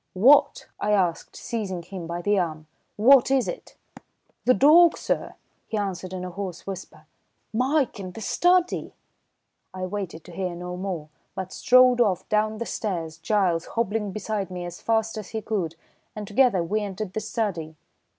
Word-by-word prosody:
"What?" 255 +10 +5
I 210 - +1
asked, 180 -5 0
seizing 195 -7 -4
him 180 -1 -7
by 170 +1 -4
the 205 0 +2
arm. 155 -3 -3 0.3
"What 250 +5 +6
is 265 -2 +2
it?" - - -7 0.7
"The 255 - +5
dawg, 325 +4 +6
sir," - - -2 0.3
he 220 - -3
answered 190 -3 -3
in 185 -1 -5
a 180 - -6
hoarse 185 -2 -6
whisper, 190 -1 -8 0.5
"Mike 260 +1 +1
in 185 -2 -7
the - - -8
study 355 - +1 0.4
" - - -52
I 185 0 -3
waited 185 -4 -5
to - - -13
hear 180 0 -3
no 180 +1 -6
more, 180 -5 -4 0.3
but 190 0 -5
strode 255 -1 +5
off 200 -6 +1
down 215 0 +1
the 235 - -3
stairs, 165 -9 -4
Giles 185 -6 +1
hobbling 215 -2 0
beside 210 -1 -3
me 180 -1 -5
as 175 0 -8
fast 225 -1 0
as 210 - -8
he 220 -2 -4
could, 180 -7 -2 0.4
and 210 -1 -5
together 205 -3 +3
we 210 +6 -1
entered 200 -1 -5
the - - -1
study. 200 -8 -3
200 Hz, 170 wpm, -25 LUFS, 180-225 Hz, 0.7 s, What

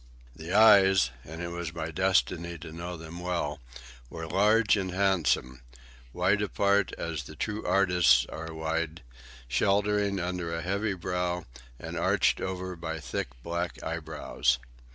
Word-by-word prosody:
The 80 +4 -8
eyes—and 95 - +4
it 85 - -3
was 85 -1 -5
my 80 +1 -4
destiny 85 -1 +1
to 80 0 -9
know 85 +2 -6
them 80 +2 -9
well—were 65 -5 -6
large 105 +6 +4
and 95 -3 -2
handsome, 90 -10 +1 0.5
wide 95 +7 +2
apart 100 -1 +2
as 80 -5 -4
the - - -10
true 105 0 -3
artist's 90 -10 +4
are 80 +3 -7
wide, 80 0 -3 0.4
sheltering 100 +7 +1
under 90 -1 -3
a 85 - -4
heavy 100 +2 -1
brow 90 -1 -2 0.3
and - - -7
arched - - +2
over 95 0 -4
by 80 -1 -5
thick 80 - -3 0.2
black 85 0 -3
eyebrows. 80 -5 -1
85 Hz, 130 wpm, -28 LUFS, 80-95 Hz, 0.5 s, eyes—and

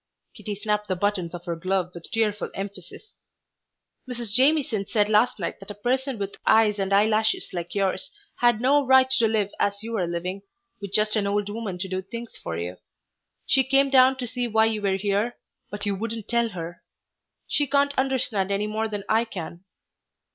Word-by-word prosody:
Kitty 210 -2 -6
snapped 210 0 -1
the 185 - 0
buttons 185 -3 -1
of 175 0 -9
her 170 -2 -2
glove 185 +1 -1
with 170 -1 -10
tearful 210 -2 0
emphasis. 195 - -8 1.0
"Mrs. 240 -4 -4
Jamieson 260 -6 +3
said 210 -2 +2
last 215 +4 +3
night 175 - -4
that 195 - -12
a 205 - -6
person 255 +4 -1
with 200 -1 -5
eyes 215 -2 +4
and 195 0 -1
eyelashes 215 +2 +2
like 175 0 -5
yours 195 +8 0 0.3
had 240 -3 +3
no 285 +3 +4
right 265 0 +6
to 235 -4 +3
live 210 -2 0
as 200 +1 0
you 230 +1 -4
are 180 -3 0
living, 180 +3 -3 0.4
with 200 -2 -6
just 215 +1 +2
an 205 -2 +1
old 205 0 0
woman 210 -4 -4
to 190 +2 -3
do 185 0 -2
things 235 +4 -8
for 80 - -5
you. 90 +2 -5 0.7
She 265 - +4
came 275 +1 +3
down 260 0 +6
to 255 - -3
see 245 +1 -2
why 220 -1 +3
you 220 -1 -1
were 195 -2 +1
here, 205 +4 -1 0.3
but 205 0 -6
you 205 - 0
wouldn't 225 +2 -4
tell 235 -1 +1
her. 175 -3 -7 0.7
She 290 - +1
can't 280 +1 +2
understand 255 -7 +1
any 200 +1 0
more 215 +1 -1
than 205 -2 -5
I 225 +1 +3
can." 175 -4 -7
210 Hz, 190 wpm, -25 LUFS, 195-235 Hz, 1.0 s, right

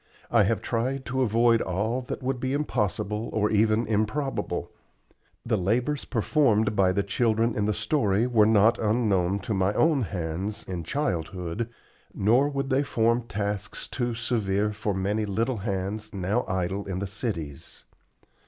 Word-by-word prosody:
I 115 -4 +5
have 110 +1 0
tried 130 +3 -1
to 130 +1 -1
avoid 115 0 +3
all 105 +8 -1
that - - -5
would 130 0 -1
be 130 +1 -1
impossible 105 - -1
or 105 -1 +1
even 110 +2 +3
improbable. 110 +6 -1 0.7
The 110 -3 +1
labors 120 +10 0
performed 110 -4 +2
by 95 -2 +4
the 100 +2 0
children 115 +2 +1
in 105 - 0
the 105 - +1
story 105 -2 +1
were 115 -4 +4
not 110 +1 +4
unknown 105 -4 +1
to 105 - -3
my 95 +1 +1
own 155 -4 +3
hands, 95 0 -3
in 90 -3 -4
childhood, 90 - -2 0.5
nor 120 +8 +3
would 140 -1 -3
they 135 +1 +3
form 115 -3 +1
tasks 105 -1 -3
too 120 -2 -2
severe 105 -3 0
for 105 -1 -2
many 105 +3 -1
little 115 +5 0
hands 100 +1 -3
now 100 +6 0
idle 95 +2 -2
in 95 -2 -3
the 100 - -2
cities. 95 - -5
110 Hz, 155 wpm, -26 LUFS, 100-120 Hz, 0.7 s, I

